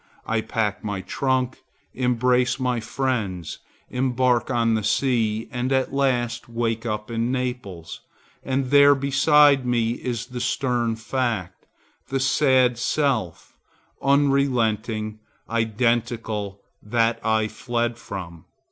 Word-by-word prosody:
I 110 0 0
pack 105 -2 -2
my 100 -3 -3
trunk, 130 +3 -1 0.3
embrace 125 0 +1
my 125 -2 0
friends, 110 - -3 0.3
embark 125 -1 +1
on 115 -2 +2
the 110 -1 0
sea 115 -3 +1
and 125 +1 -2
at 130 0 +1
last 120 -3 0
wake 115 0 -2
up 105 +1 -4
in 115 +1 -1
Naples, 125 -10 -4 0.4
and 130 -1 -2
there 145 0 +7
beside 140 0 +4
me 120 -2 +1
is 120 -1 -4
the 125 -1 -6
stern 120 -4 0
fact, 110 -6 -3 0.4
the 135 - -1
sad 130 -2 +3
self, 125 - -1 0.5
unrelenting, 120 -6 +1 0.3
identical, 115 -3 -1 0.2
that 115 +1 0
I 110 -1 +2
fled 120 +1 -2
from. 85 -7 -8
120 Hz, 110 wpm, -23 LUFS, 110-130 Hz, 0.5 s, there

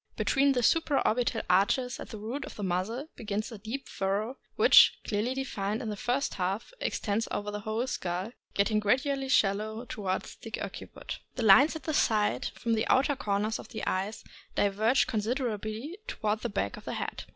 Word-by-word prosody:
Between 275 0 +3
the 245 -2 0
supra 310 +1 +3
orbital 235 0 +1
arches 210 +8 +2
at - - -8
the 220 - -7
root 235 +7 -4
of - - -10
the 210 - -5
muzzle 200 - -2
begins 215 +1 -3
a 225 - -8
deep 225 +7 -5
fur 195 +1 0
row, 245 +6 -6 0.2
which, - - +7
clearly 220 +5 -1
denned 215 -6 -2
in 225 - -4
the 210 - -3
first 250 +7 -1
half, 195 - -2
extends 215 +1 -1
over 205 0 -3
the 210 - -4
whole 220 +3 -2
skull, 185 -3 -3 0.2
getting 210 +2 +2
gradually 270 +5 +1
shallow 215 0 +1
toward 190 -5 -2 0.2
the - - -5
occiput. - - -7 0.2
The 245 - -2
lines 270 +11 +7
at 320 - -6
the 315 - -2
sides, 215 -6 +2
from 230 -1 -1
the 220 0 +1
outer 275 +2 +3
corners 210 -2 -1
of - - -9
the 220 - -5
eyes, 195 +4 -2 0.3
diverge 215 +6 +3
considerably 225 - -2
toward 215 - -1
the 240 - -3
back 200 - -2
of - - -12
the - - -3
head. - - -4
220 Hz, 185 wpm, -29 LUFS, 205-255 Hz, 0.3 s, which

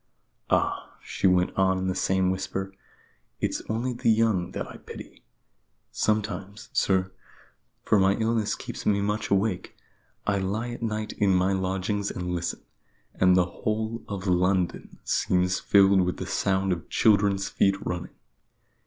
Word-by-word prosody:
"Ah," - - 0
she - - 0
went 90 -1 +2
on 95 -1 +2
in 95 - -2
the 95 - 0
same 95 0 +1
whisper, 95 +1 -4 0.7
"it's - - -1
only 120 +3 -1
the 120 - 0
young 110 -5 +2
that - - -5
I - - -10
pity. - - -11 0.7
Sometimes, 105 0 -2
sir 95 -1 +1 0.7
for 105 - +3
my 95 +1 +4
illness 110 -1 0
keeps - - -7
me 100 -1 +2
much 105 +2 -1
awake 100 -1 0 0.5
I 100 -1 +1
lie 105 +5 -2
at 120 - -7
night 110 -1 -3
in 95 -2 +2
my 95 +2 +2
lodgings 95 +2 -1
and 90 0 -4
listen, 85 -1 -3 0.5
and 90 0 +4
the 90 - +4
whole 110 +5 -3
of 100 -2 -5
London 90 0 0
seems 90 0 +1
filled 100 -1 +5
with 90 0 -1
the 95 - -5
sound 95 0 +1
of 85 - -7
children's 100 -2 +3
feet 95 0 +2
running. 90 -1 -4
95 Hz, 150 wpm, -26 LUFS, 95-105 Hz, 0.7 s, filled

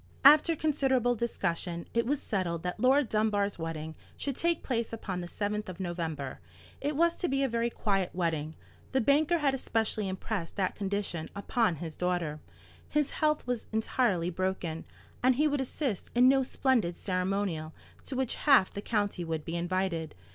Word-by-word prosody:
After 305 +3 +8
considerable 270 -5 +2
discussion, 180 -7 -2
it 235 0 +1
was 285 +1 +1
settled 175 -5 -2
that 180 +3 -3
Laura 265 +5 +5
Dunbar's 210 -4 0
wedding 160 -1 -4 0.2
should 280 -3 -3
take 340 +2 +1
place 235 -3 -1
upon 195 -5 -4
the 175 - -5
7th 210 +2 -3
of 180 -1 -8
November. 165 -6 -3 0.4
It 290 +1 -1
was 335 +3 +4
to 355 - -1
be 275 -2 +1
a - - +3
very 235 -1 0
quiet 195 -5 0
wedding. 160 -3 -1 0.4
The 265 - +4
banker 295 +7 +3
had 290 -4 +2
especially 220 -5 -1
impressed 190 -2 -4
that 190 -2 0
condition 195 -5 -2
upon 200 -2 +1
his 160 0 -6
daughter. 175 -4 -1 0.5
His 300 -1 +1
health 305 -1 +1
was 245 -2 -2
entirely 220 -5 +1
broken, 180 -3 -2 0.4
and 255 0 +4
he 300 +4 +3
would 290 -2 0
assist 260 - -2
in 250 +1 +7
no 270 +1 +5
splendid 250 -9 +1
ceremonial 185 -4 -1 0.3
to 270 - -4
which 260 -2 0 0.2
half 255 -9 +6
the 200 - -4
county 205 -5 -1
would 160 -2 -3
be 165 - -3
invited. 175 -2 -1
205 Hz, 170 wpm, -30 LUFS, 175-260 Hz, 0.5 s, After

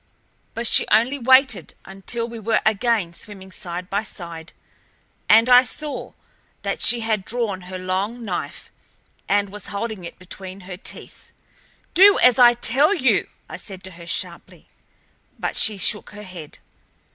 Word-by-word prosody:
But 235 - -3
she - - +4
only 240 +6 +2
waited 260 -1 +3
until 195 +5 -3
we 230 -1 -8
were 220 +1 +1
again 215 -4 +1
swimming 190 0 -9
side 180 0 -6
by 200 +2 -1
side, 170 -5 -8 0.8
and 225 +2 +6
I 250 0 +8
saw 295 +3 -5 0.5
that - - -3
she 240 -1 +4
had 220 -3 -1
drawn 215 -4 -3
her 185 - -5
long 195 +6 -3
knife, 185 -4 -5 0.6
and 200 0 +1
was 210 +1 -7
holding 205 -2 -5
it 170 - -9
between 185 +1 -10
her 180 0 -8
teeth. 180 - -6 0.6
"Do 395 +2 +7
as 250 0 +5
I 240 -1 +7
tell 275 - +3
you!" 265 -8 +2 0.2
I - - -8
said 190 -3 -8
to 185 - -9
her 170 -1 -13
sharply, 175 - -6 0.7
but - - -3
she 215 -2 +3
shook 210 +2 +1
her 210 0 -10
head. 175 -6 -10
210 Hz, 155 wpm, -22 LUFS, 185-235 Hz, 0.8 s, I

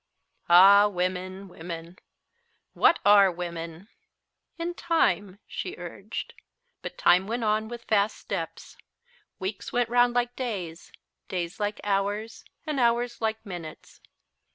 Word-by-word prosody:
Ah, 200 +4 +8
women, 185 0 -3
women! 170 0 -8 0.7
What 335 - +4
are 200 -2 +7
women? 170 +1 -6 0.7
"In 340 +1 -3
time," 205 - +1
she - - -5
urged. - - -7 0.5
But - - -7
time 185 +2 +4
went 235 +2 -2
on 215 0 +1
with 235 0 -8
fast 210 -1 +1
steps. - - -6 0.6
Weeks 190 +1 -5
went 240 -1 +1
'round 245 0 +3
like 245 0 0
days, 185 -10 -5 0.4
days 175 0 -4
like 205 0 -2
hours 205 +2 -1 0.2
and 305 -4 -2
hours 240 0 +1
like 220 0 -2
minutes. 175 -5 -9
205 Hz, 120 wpm, -27 LUFS, 180-235 Hz, 0.7 s, Ah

